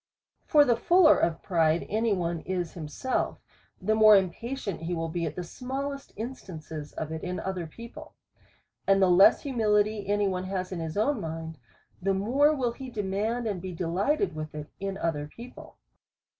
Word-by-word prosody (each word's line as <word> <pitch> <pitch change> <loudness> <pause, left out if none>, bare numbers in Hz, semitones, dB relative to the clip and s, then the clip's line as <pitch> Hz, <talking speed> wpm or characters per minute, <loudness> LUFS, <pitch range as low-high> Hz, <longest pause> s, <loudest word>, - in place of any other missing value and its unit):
For 295 -1 +6
the 240 -3 +3
fuller 340 +7 +5
of 165 -1 0
pride 165 -2 +2
any 220 +2 0
one 175 -3 -1
is 180 -1 -3
himself, 170 +10 -2 0.4
the 215 +3 +1
more 215 -1 +8
impatient 200 +1 -1
ivill 165 -1 -2
he - - -8
be 170 - 0
at - - -6
the 180 - -4
smallest 270 +8 -5
instances 165 - -7
of 155 0 -5
it 160 0 -5
in 180 0 -3
other 185 -3 -3
people. 235 - -11 0.7
And 195 0 +5
the 190 -2 +4
less 180 +3 +6
humility 215 -5 +1
any 205 0 +2
one 185 -1 -2
has 185 -1 -3
in 180 - -4
his 160 +2 -4
own 280 +7 +1
mind, 160 -1 -6 0.4
the 195 +1 +1
more 260 +10 +3
will 250 -4 0
he 260 +2 -8
demand, 215 +2 -2
and 200 -5 -2
be 185 0 -6
de 175 - -3
lighted 200 - +1
with 155 0 -6
it 150 0 -7
in 195 0 -3
other 150 -5 -2
people. 235 +10 -12
195 Hz, 180 wpm, -28 LUFS, 170-235 Hz, 0.7 s, more